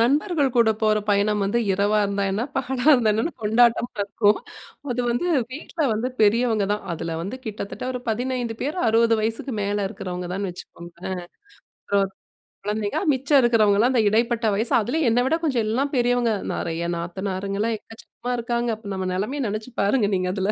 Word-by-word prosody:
நண்பர்கள் 285 - +2
கூட 230 -2 +5
போற 215 0 +3
பயணம் 205 0 +2
வந்து 205 +4 +1
இரவா 205 +2 +2
இருந்தா 200 0 -1
என்ன, 215 +4 -1
பகலா 265 -1 -2
இருந்தா 235 -5 +4
என்னன்னு 225 +11 -1
கொண்டாட்டமா 235 +2 +3
இருக்கும், 205 +1 +2 0.5
அது 245 - 0
வந்து 240 +9 0 0.3
வீட்ல 320 +3 -7
வந்து 225 +4 -1
பெரியவங்க 220 0 +3
தான் 210 - -3
அதில 165 0 -4
வந்து 200 +8 -5
கிட்டத்தட்ட 210 +2 -5
ஒரு 250 - -4
15 240 0 -2
பேர், 300 +7 -2
60 230 +1 +4
வயசுக்கு 225 +3 -2
மேலே 205 +1 -1
இருக்கிறவங்க 180 -2 -5
தான்ன்னு 195 0 -2
வச்சுக்கோங்களேன், 175 +1 -8
ஆ, - - -17 0.6
அப்புறம் 195 -1 0 0.5
குழந்தைங்க 210 0 -1
மிச்சம் 275 +2 +3
இருக்கிறவங்கலாம் 225 -1 +4
அந்த 235 - +4
இடைப்பட்ட 230 +1 +1
வயசு, 220 +4 0
அதிலேயும் 255 +4 +1
என்னை 245 +2 +3
விட 295 +5 +2
கொஞ்சம் 255 -7 +1
எல்லாம் 270 +6 0
பெரியவங்க 245 -1 +2 0.2
நிறைய 165 +1 -3
நாத்தனாருங்கலாம் 195 +5 -2
எக்கச்சக்கமா 230 +3 -9
இருக்காங்க, 235 0 -1
அப்போ 220 -2 -12
நம்ம 190 -1 -3
நிலைமையை 215 +10 -2
நினைச்சு 215 +3 -5
பாருங்க 205 +2 +2
நீங்க 185 0 0
அதில. 195 +1 0
220 Hz, 165 wpm, -23 LUFS, 200-245 Hz, 0.6 s, கூட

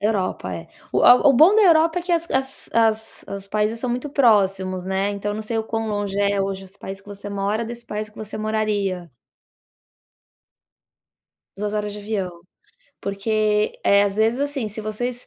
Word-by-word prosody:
Europa, 195 - -1
é, 85 -1 -8 0.2
o - - +2
a - - +10
o 275 - +7
bom 320 - +6
da 435 - +6
Europa 330 -1 +5
é - - -4
que 350 0 -2
as 335 0 0
as 265 0 -2
as 220 -1 +1
os 195 0 -6
países 215 +2 0
são 250 - -2
muito 250 +4 -3
próximos, 195 -8 +2
né, 190 +1 0
então, 205 +1 -3
não 215 - -4
sei 225 +1 -2
o 220 - -1
quão 225 0 -3
longe 205 -1 -2
é 200 0 +2
hoje 195 0 -3
esse 190 +2 -14
país 195 0 -7
que 200 - -27
você 205 0 -8
mora, 200 +3 -1
desse 235 +1 -8
país 215 0 -4
que 215 - -28
você 215 -1 -6
moraria. 205 -5 -1 2.5
2 210 +1 -3
horas 210 -1 -2
de 210 - -7
avião, 200 -3 -3 0.7
porque, 210 +1 0
eh, 200 0 +5
às 200 -1 -1
vezes 225 +4 +2
assim, 285 -5 -2
se 210 +1 -7
vocês 245 +4 -4
210 Hz, 190 wpm, -22 LUFS, 200-230 Hz, 2.5 s, a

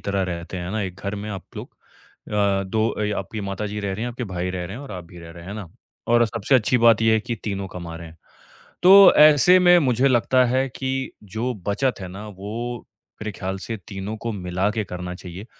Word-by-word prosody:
तरह 100 -1 -1
रहते 90 0 -5
हैं 90 0 -5
ना? 110 +1 -2
एक 95 -2 -5
घर 100 +1 -3
में 105 +1 -6
आप 95 -2 -6
लोग - - -7 0.6
अ, 100 -2 +1
2 110 +4 0
अ, 105 -1 -2
आपकी 110 - -5
माताजी 100 +1 -4
रह 100 -1 -2
रहीं 110 +5 -4
हैं, - - -2
आपके 125 +1 -5
भाई 90 -3 -3
रह 90 -1 -4
रहे 95 +5 -7
हैं 135 - -8
और 140 - -9
आप 90 -2 -7
भी 85 +1 -14
रह 85 -1 -11
रहे, 85 0 -12
हैं 100 +3 -7
ना? 100 -6 -7 0.4
और 120 0 +5
सबसे 115 +4 -1
अच्छी 125 +1 +3
बात 115 -1 +5
ये 110 0 +4
है 110 - +3
कि 120 - -4
तीनों 100 -2 -3
कमा 85 -2 -7
रहे 85 0 -9
हैं। 80 - -16 0.7
तो 195 +2 +9
ऐसे 155 +4 +7
में 180 -1 +6
मुझे 130 -2 +2
लगता 130 0 +3
है 130 +2 +1
कि 130 - -3 0.3
जो 110 +5 -3
बचत 125 +5 0
है 95 - -5
ना, 100 +4 -8
वो 110 +5 -6 0.4
मेरे 110 0 -3
ख़्याल 95 0 -3
से 115 - -4
तीनों 100 0 -5
को 115 - 0
मिलाके 100 +3 -1
करना 90 -1 -6
चाहिए 90 +3 -9
105 Hz, 230 wpm, -23 LUFS, 95-120 Hz, 0.7 s, तो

